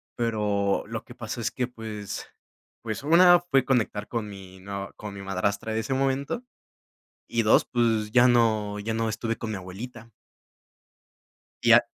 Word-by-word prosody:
pero 105 -4 0
lo - - -5
que - - -13
pasó - - -5
es - - 0
que, 125 - -2
pues 110 -4 -6 0.6
pues, 110 -1 -4
1 175 +4 +7
fue 135 -2 +4
conectar 110 -5 0
con 110 -3 -3
mi 95 -1 -11
nueva 100 0 -6
con 105 -2 -8
mi 100 - -7
madrastra 100 +3 -1
de 110 - 0
ese 130 +4 -1
momento, 135 - -1 0.8
y 115 -1 0
2, 110 - +5
pues, 110 -3 +1
ya 125 0 +6
no 110 -3 +2
ya 110 +2 -3
no 115 0 0
estuve 115 +1 -2
con 110 - -5
mi 105 - -3
abuelita. 115 +6 -9 1.5
Y - - +6
a - - +8
110 Hz, 165 wpm, -26 LUFS, 100-120 Hz, 1.5 s, a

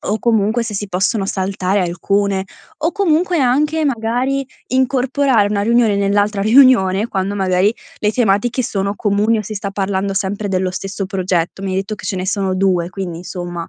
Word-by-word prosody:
o 215 - -2
comunque 225 0 +1
se 220 -2 -5
si 205 +1 -3
possono 195 +2 0
saltare 190 0 -1
alcune 190 +2 0 0.4
o 335 - +1
comunque 355 -3 +1
anche, 300 +5 +2
magari, 255 +2 -1 0.2
incorporare 260 -3 +2
una 200 -1 0
riunione 230 -2 +3
nell'altra 205 +1 +1
riunione, 215 -3 +4
quando 195 0 -2
magari 190 +2 +1 0.2
le 210 0 0
tematiche 240 +2 +1
sono 200 -2 -2
comuni 210 +2 +1
o - - -2
si 215 +2 -7
sta 200 -1 -4
parlando 195 0 -1
sempre 200 +2 -2
dello 185 -1 0
stesso 195 +2 -4
progetto. 185 -1 -2
Mi 195 - -3
hai 185 - -1
detto 195 +2 -4
che - - -9
ce - - -2
ne 185 0 -3
sono 190 -1 0
2, 185 -2 +1
quindi 180 -3 -5
insomma 175 -1 -6
200 Hz, 175 wpm, -17 LUFS, 190-235 Hz, 0.4 s, riunione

